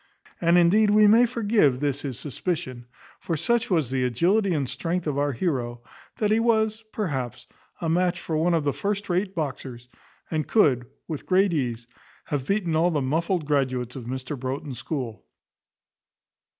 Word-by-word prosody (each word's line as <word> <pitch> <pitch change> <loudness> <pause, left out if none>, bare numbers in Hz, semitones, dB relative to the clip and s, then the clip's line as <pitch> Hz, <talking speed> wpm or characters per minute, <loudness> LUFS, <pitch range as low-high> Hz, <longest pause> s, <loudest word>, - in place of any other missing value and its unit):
And 170 0 +4
indeed 200 +5 +5
we 210 +1 +6
may 230 +4 +6
forgive 205 - +2
this 145 -1 -1
his 135 -5 -5
suspicion; 130 -5 -4 0.3
for 165 - -2
such 235 +8 +1
was 160 - +1
the 130 -1 0
agility 180 - +2
and 145 -5 0
strength 175 +6 -3
of 145 -2 -1
our 145 0 +1
heroe, 120 -5 -2 0.3
that 215 -3 +1
he 220 - +4
was, 220 -1 +1
perhaps, 135 - -3 0.3
a 165 - -2
match 175 +2 +1
for 160 - -3
one 170 +2 +2
of 160 - +1
the 145 -1 0
first 200 0 -3
rate 185 +2 0
boxers, 130 -5 -5 0.4
and 155 -2 -1
could, 130 - +3 0.2
with 155 -4 -6
great 190 0 +3
ease, 120 -6 -2 0.4
have 140 -3 -3
beaten 195 -5 0
all 165 +3 +3
the 155 -4 0
muffled[*] 160 +5 0
graduates 130 -4 0
of 125 -3 -7
Mr 130 +3 -4
Broughton's 130 0 -4
school. 125 -4 -5
155 Hz, 165 wpm, -25 LUFS, 130-190 Hz, 0.4 s, we